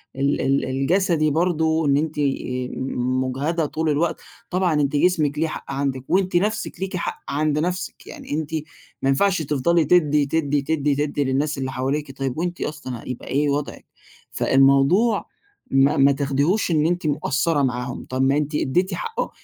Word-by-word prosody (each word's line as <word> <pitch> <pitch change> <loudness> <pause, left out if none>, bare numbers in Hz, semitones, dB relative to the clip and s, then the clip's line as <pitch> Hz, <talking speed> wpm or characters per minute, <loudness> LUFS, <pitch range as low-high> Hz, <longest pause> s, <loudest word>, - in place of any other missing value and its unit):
ال 140 0 +1
الجسدي 155 +4 +1
برضو، 160 -1 +1
إن 140 -1 +3
أنتِ 155 +1 -2
آآ 130 -3 -1
م 130 0 -1
مجهدة 145 +6 -1
طول 155 +2 -2
الوقت، 155 +3 0 0.3
طبعًا 180 -2 +1
أنتِ 145 -1 +1
جسمِك 150 -3 +2
ليه 160 - +2
حق - - -7
عندِك 135 -2 -2
وأنتِ 185 -1 +1
نفسِك 215 +5 0
لِيكِ 190 -1 -3
حق 170 - -4
عند 150 +1 0
نفسِك، 180 +2 -3
يعني - - -10
أنتِ 155 +1 -3 0.5
ما 135 - +1
ينفعش 185 +6 +2
تفضلي 155 +3 +1
تدي، 150 -3 +3
تدي، 145 -1 0
تدي، 145 0 0
تدي 145 0 -1
للناس 140 +3 0
اللي 130 -1 -3
حواليكِ 135 +3 -2
طيب 135 -1 -3
وأنتِ 175 +1 -3
أصلًا 130 -6 -5
هيبقى 125 - -7
إيه 145 +2 +1
وضعِك؟ 145 +1 -3 0.5
فالموضوع 140 - +3 0.5
ما 135 +1 +4
ما 140 +1 +6
تاخديهوش 140 +8 +1
إنِ 155 -2 +2
أنتِ 175 -1 0
مقصرة 145 +1 +1
معاهم 125 -1 -3
طب 130 0 -1
ما 135 +2 +3
أنتِ 150 0 -2
اديتِ 180 +7 +1
حقهم 460 -1 -3
150 Hz, 165 wpm, -22 LUFS, 135-165 Hz, 0.5 s, ما